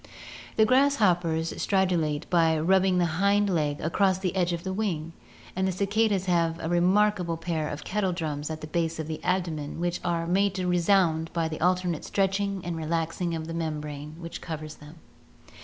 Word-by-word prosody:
The 220 - +5
grasshoppers 185 - +2
stridulate 170 -6 +1
by 165 -2 +4
rubbing 190 +2 +3
the 175 - +3 0.2
hind 200 0 +3
leg 150 -4 0
across 190 +4 +2
the 190 -1 -2
edge 180 -2 +1
of 170 -1 -3
the 190 - -3
wing, 170 -6 -2 0.4
and 190 +1 +1
the - - +1
cicadas 200 +1 +1
have 170 -2 +1
a - - -4
remarkable 180 0 +2
pair 165 -2 -2
of 145 +1 -6
kettle 195 -2 -1
drums 155 -4 -3
at 155 0 -5
the - - -5
base 165 +1 -1
of 160 - -3
the 155 0 -6
abdomen 165 -5 -2
which 175 0 -1
are 170 -1 -1
made 195 +3 +1
to 185 -2 -2
resound 175 -2 +2
by 165 -1 0
the 155 -1 -6
alternate 180 -2 +1
stretching 195 -1 -1
and 175 -1 -3
relaxing 165 +2 -2
of 160 -1 -4
the 165 - -6
membrane 150 -2 -4
which 170 -1 -7
covers 155 -2 -6
them. 150 +2 -13
175 Hz, 180 wpm, -27 LUFS, 160-190 Hz, 0.4 s, The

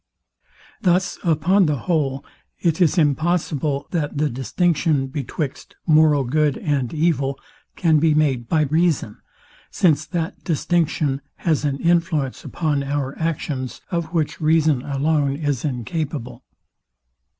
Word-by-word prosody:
Thus 185 -1 +1
upon 175 +3 +3
the 150 - +1
whole, 140 -6 0 0.3
it 165 +1 0
is 175 +1 +3
impossible, 150 -2 +1
that 150 -4 -2
the 150 0 +1
distinction 150 +2 +1
betwixt 140 +1 -5
moral 155 -3 +4
good 150 +3 +1
and 135 -5 -1
evil, 150 -4 0 0.4
can 160 -3 +3
be 155 0 +3
made 135 -6 +1
to 155 -2 +3
reason; 160 -9 +1 0.5
since 155 -5 +2
that 175 +1 -4
distinction 155 -4 0
has 155 -3 0
an 140 -2 0
influence 165 -5 0
upon 150 -4 -1
our 140 -1 -2
actions, 145 -5 -3
of 170 -2 0
which 160 -2 -2
reason 155 -3 +3
alone 140 0 0
is 145 -4 -2
incapable. 140 0 -4
150 Hz, 120 wpm, -21 LUFS, 140-165 Hz, 0.5 s, moral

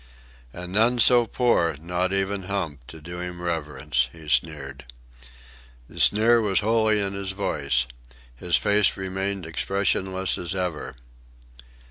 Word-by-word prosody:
"And 90 +4 -8
none 115 +4 +3
so 120 -1 +5
poor, 110 - +1
not 90 +3 -2
even 95 0 -1
Hump, 80 -10 -4
to 80 - -11
do 85 +3 -8
him 90 0 -6
reverence," 75 -6 -1
he 80 -2 -14
sneered. 70 -3 -1 1.0
The - - -9
sneer 115 +3 +5
was 100 -4 +1
wholly 110 0 +2
in 100 -1 -2
his 100 -1 -4
voice. 70 -10 0 0.5
His 85 +7 0
face 105 -1 +2
remained 95 0 -3
expressionless 95 +2 -1
as 90 +2 -3
ever. 90 -4 -3
95 Hz, 130 wpm, -24 LUFS, 80-100 Hz, 1.0 s, so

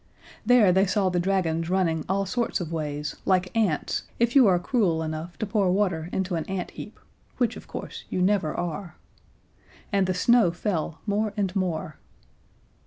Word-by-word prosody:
There 240 -6 +5
they 190 +2 +3
saw 190 0 +1
the 180 -1 0
dragons 170 -3 0
running 170 -4 +1
all 195 +1 +1
sorts 235 +4 -1
of 170 -3 -5
ways 150 -1 -3
like 185 0 +1
ants 205 -9 0 0.2
if 235 +2 +1
you 260 -5 +7
are 185 -2 +4
cruel 175 -5 +1
enough 160 +2 -5
to - - -2
pour 200 -2 +1
water 180 -4 0
into 190 -1 -2
an 165 -2 -1
ant 190 -2 -4
heap, - - -10 0.4
which, 245 -2 +1
of - - -11
course, - - -7
you - - -2
never 185 -3 +2
are. 175 +1 -4 1.0
And 195 -2 +3
the 185 - 0
snow 235 +1 +4
fell 170 -2 -3
more 210 0 0
and 195 -2 -1
more. 165 -5 -2
185 Hz, 175 wpm, -26 LUFS, 165-205 Hz, 1.0 s, you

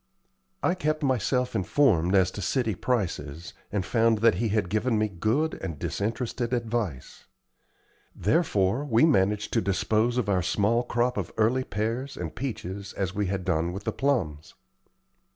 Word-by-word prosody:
I 180 - +3
kept 155 -4 -1
myself 125 -1 +1
informed 95 - +3
as 95 -1 +4
to 100 - -6
city 115 +3 0
prices, 85 - -3 0.2
and 100 -2 -1
found 115 +1 +3
that 115 +1 +4
he 115 - +1
had 105 -3 +1
given 110 +4 0
me 110 0 +2
good 110 - 0
and 85 -6 -4
disinterested 115 - -2
advice. 115 - -3 0.9
Therefore, 105 - +1
we 120 -2 +4
managed 105 -8 +2
to - - +3
dispose 110 +5 +1
of 120 -4 0
our 95 -3 +2
small 105 +6 +2
crop 120 0 0
of 95 -3 -3
early 120 +4 +2
pears 115 +5 -3
and 85 -3 -5
peaches 100 -6 -5
as 95 -2 -2
we 105 -1 -1
had 95 -1 -3
done 85 -1 0
with 95 +2 -6
the - - -1
plums. 95 - -1
110 Hz, 155 wpm, -27 LUFS, 95-125 Hz, 0.9 s, as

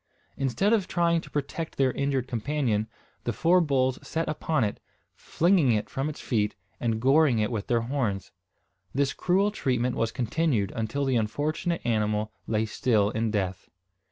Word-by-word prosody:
Instead 135 - +1
of 205 -5 +2
trying 170 -1 +2
to - - -13
protect 150 +3 -4
their 135 -1 +3
injured 135 -2 -1
companion, 120 -3 -1 0.4
the 120 - -1
four 175 +7 +3
bulls 130 -4 +1
set 165 0 -3
upon 155 -2 0
it, 105 - -2 0.3
flinging 170 -6 +2
it 105 - -2
from 135 +3 -1
its 150 - -7
feet, 105 -4 0 0.2
and 115 -2 0
goring 135 +1 +4
it 105 +1 0
with 110 -3 -3
their 120 -2 +2
horns. 115 -6 -2 0.6
This 140 0 +1
cruel 195 +3 +2
treatment 125 - 0
was 115 0 0
continued 125 - 0
until 115 +6 -1
the 130 -2 +2
unfortunate 150 +9 -1
animal 105 -2 0 0.2
lay 110 0 +1
still 105 -2 +1
in 110 +1 0
death. 95 -3 -2
130 Hz, 160 wpm, -27 LUFS, 110-155 Hz, 0.6 s, goring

